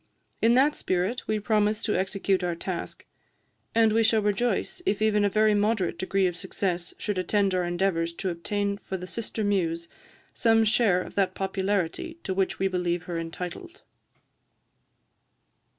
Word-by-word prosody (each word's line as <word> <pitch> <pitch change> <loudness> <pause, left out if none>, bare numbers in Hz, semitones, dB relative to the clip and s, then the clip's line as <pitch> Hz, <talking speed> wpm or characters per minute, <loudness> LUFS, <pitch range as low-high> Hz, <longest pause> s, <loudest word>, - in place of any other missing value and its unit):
In 230 +1 +5
that 280 +4 +4
spirit 185 +4 -2
we 215 0 0
promise 210 0 +1
to 210 - 0
execute 190 0 0
our 175 -1 -1
task; 175 0 -5 0.7
and 225 -1 +4
we 225 - +4
shall 220 -1 +3
rejoice 240 - 0
if 205 - +1
even 215 -1 +3
a 205 - +3
very 215 +1 +3
moderate 205 -4 +1
degree 190 +1 +1
of 175 -2 0
success 180 -1 -3
should 205 -3 -2
attend 200 +1 +1
our 180 -1 +1
endeavours 175 -1 0
to 185 +2 -3
obtain 200 +4 -2
for 190 - -5
the 180 - -7
sister 220 +2 -4
muse 170 -5 0 0.5
some 225 -1 +4
share 215 -4 +3
of - - -11
that 190 -2 +1
popularity 195 - -2
to 190 - -2
which 190 0 0
we 195 - +1
believe 180 -2 -1
her 175 -2 -4
entitled." 180 - -7
195 Hz, 160 wpm, -27 LUFS, 180-215 Hz, 0.7 s, In